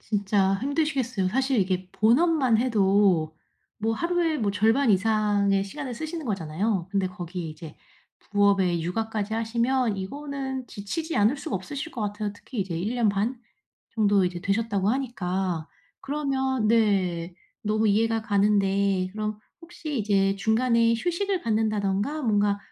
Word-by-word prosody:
진짜 200 -2 +1
힘드시겠어요. 265 - 0
사실 265 +3 +1
이게 185 -1 -1
본업만 255 +1 +3
해도 195 -8 +2 0.4
뭐 225 +1 0
하루에 340 +3 0
뭐 210 -3 0
절반 225 +5 +3
이상의 200 -1 +2
시간을 260 +4 -6
쓰시는 315 +2 -5
거잖아요. 190 0 -1
근데 195 -2 +1
거기에 180 -3 -6
이제 155 0 -10 0.4
부업에 200 -4 +2
육아까지 215 +4 -2
하시면 235 0 0
이거는 265 +4 -5
지치지 315 +13 -4
않을 215 +7 +3
수가 215 -7 -3
없으실 280 - -6
것 240 - -6
같아요. 205 0 -3
특히 225 +1 -6
이제 180 -3 -3
1 210 +8 -2
년 235 -3 +2
반 215 +5 -1 0.5
정도 205 -3 +3
이제 180 -1 -3
되셨다고 200 0 0
하니까. 190 - -2 0.3
그러면 265 -4 -1
네 185 -6 +1 0.3
너무 215 +1 +1
이해가 225 +2 +2
가는데 200 -2 +2
그럼 215 0 -3 0.2
혹시 315 -5 -6
이제 195 -2 +2
중간에 230 +2 +2
휴식을 360 - -1
갖는다든가 215 +4 0
뭔가 205 -3 +2
215 Hz, 315 characters per minute, -26 LUFS, 195-255 Hz, 0.5 s, 본업만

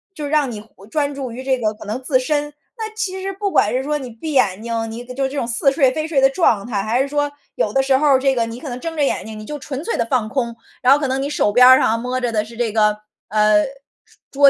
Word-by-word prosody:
就 300 -3 -4
让 290 -3 +1
你 215 - -6
呼 210 -2 -18
专 285 +4 -1
注 265 -3 -5
于 250 +3 -7
这 265 -1 +1
个 215 -2 0
可 210 - -12
能 215 +5 -4
自 255 -1 +2
身。 295 +2 -1 0.2
那 440 -1 -4
其 380 -4 -3
实 390 +1 -3
不 400 +1 -2
管 210 - +3
是 255 +1 0
说 300 +2 -1
你 260 -3 -7
闭 240 +7 -6
眼 210 -6 +2
睛， 230 -1 -2
你 230 +2 -7
搁 250 +1 -9
就 270 +2 -2
是 - - -1
这 285 - -6
种 255 - 0
似 245 +4 +2
睡 270 -3 +3
非 310 +4 -3
睡 310 -4 +1
的 270 - +7
状 255 - +2
态， 215 -5 -2
还 220 +5 0
是 270 - 0
说 290 0 0 0.2
有 210 - 0
的 270 - +3
时 265 0 +3
候 300 +2 +2
儿 275 -2 +6
这 270 0 +2
个 235 -3 0
你 230 +1 -7
可 300 - -7
能 245 0 -5
睁 330 +3 -5
着 295 - +2
眼 275 - 0
睛， 220 0 -8
你 215 - -8
就 295 +6 -6
纯 275 +1 -6
粹 460 - -2
地 - - +1
放 230 -2 0
空。 235 -2 -2 0.3
然 250 - +5
后 285 - +3
可 290 - -1
能 265 +1 -1
你 280 - -2
手 250 -7 +1
边 250 +3 +7
儿 260 0 +9
上 230 -2 +2
摸 250 +2 -2
着 245 -1 -1
的 215 -2 0
是 230 +2 -12
这 230 -1 -1
个， 210 -1 +2 0.3
呃， 210 0 +4 0.4
是 - - -26
桌 280 0 +6
260 Hz, 325 characters per minute, -20 LUFS, 230-290 Hz, 0.4 s, 儿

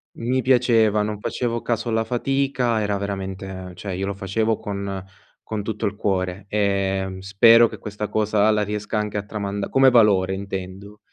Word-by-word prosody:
Mi 125 +3 -1
piaceva, 115 -4 +3
non 105 -1 -3
facevo 120 +2 -2
caso 120 +1 -2
alla 110 0 +1
fatica, 125 -1 0
era 105 -1 0
veramente 95 -2 -5
cioè 95 +2 -6
io 95 +1 -2
lo 100 - -3
facevo 110 +3 -1
con 100 -2 -5 0.4
con 105 -2 -4
tutto 110 0 -3
il 100 - -4
cuore, 95 -1 -2
ehm, 95 -2 -1
spero 115 +5 +6
che - - -9
questa 105 0 -5
cosa 105 0 +2
la 105 - +1
riesca 105 +1 -3
anche 105 -1 -3
a 100 - -2
tramand 100 -1 -4
come 135 0 +5
valore 100 -5 +4
intendo. 100 +1 -7
105 Hz, 165 wpm, -22 LUFS, 95-110 Hz, 0.4 s, spero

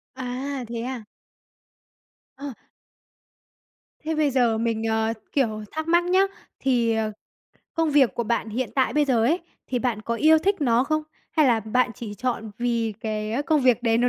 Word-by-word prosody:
À, 260 +1 -4
thế 235 0 -4
à? 250 -3 -4 1.3
Ờ. 275 0 -6 1.5
Thế 315 0 -3
bây 305 -2 +2
giờ 240 -3 +3
mình, 225 -1 -1
ờ, 220 0 +1 0.2
kiểu, 220 -6 0
thắc 315 +1 -4
mắc 345 +1 +4
nhá, 370 +2 +3 0.4
thì, 240 -4 +2
ờ, 220 -1 0 0.6
công 325 -2 +1
việc 280 -4 +4
của 235 - -1
bạn 235 0 -1
hiện 235 +3 -2
tại 265 -2 +2
bây 300 0 +3
giờ 240 -5 +2
ấy, 320 +8 +3 0.3
thì 250 - -1
bạn 230 -4 -1
có 235 - -2
yêu 315 +6 +5
thích 390 +3 0
nó 245 -2 +3
không? 310 +1 0 0.3
Hay 310 -3 +4
là 230 -3 +3
bạn 240 +4 +1
chỉ 210 -1 -7
chọn 235 -1 -3
vì 235 -2 0
cái 215 +2 -2
công 305 0 +2
việc 250 -3 +3
đấy 230 -1 +3
nó 245 +1 +3
245 Hz, 180 wpm, -24 LUFS, 225-285 Hz, 1.5 s, yêu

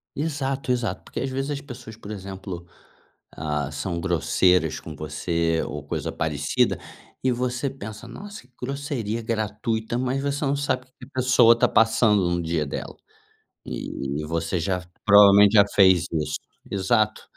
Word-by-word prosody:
Exato, 140 -3 -2
exato. 115 -6 -1
Porque - - -6
às 135 +2 -2
vezes 135 +2 -2
as 140 -1 -3
pessoas, 120 -5 -10
por 110 -1 -10
exemplo, 95 -3 -7 0.7
ah, 75 -1 -2
são 85 +4 -3
grosseiras 90 -1 +2
com 80 -2 -9
você 80 +2 -1
ou 75 +1 -6
coisa 70 - -3
parecida 75 -3 0 0.4
e 130 - +3
você 125 +2 -1
pensa: 110 -2 -9
"Nossa, 200 - -9
que 125 - -37
grosseria 125 -5 -3
gratuita." 110 +1 -2
Mas 130 +2 -1
você 140 +1 -1
não 140 +1 +1
sabe 140 -2 -1
o - - -27
que 130 - -34
que - - -9
a - - -23
pessoa 120 -2 +6
está 115 - +3
passando 110 -4 +4
no 85 0 0
dia 80 -2 0
dela, 70 - -6 0.7
e 70 +3 -4
você 85 +2 -1
já 90 +1 -1 0.2
provavelmente 100 0 +8
já 100 -1 +8
fez 95 -3 +6
isso, 75 -2 -1 0.3
exato. 105 +2 +1
105 Hz, 160 wpm, -24 LUFS, 85-125 Hz, 0.7 s, provavelmente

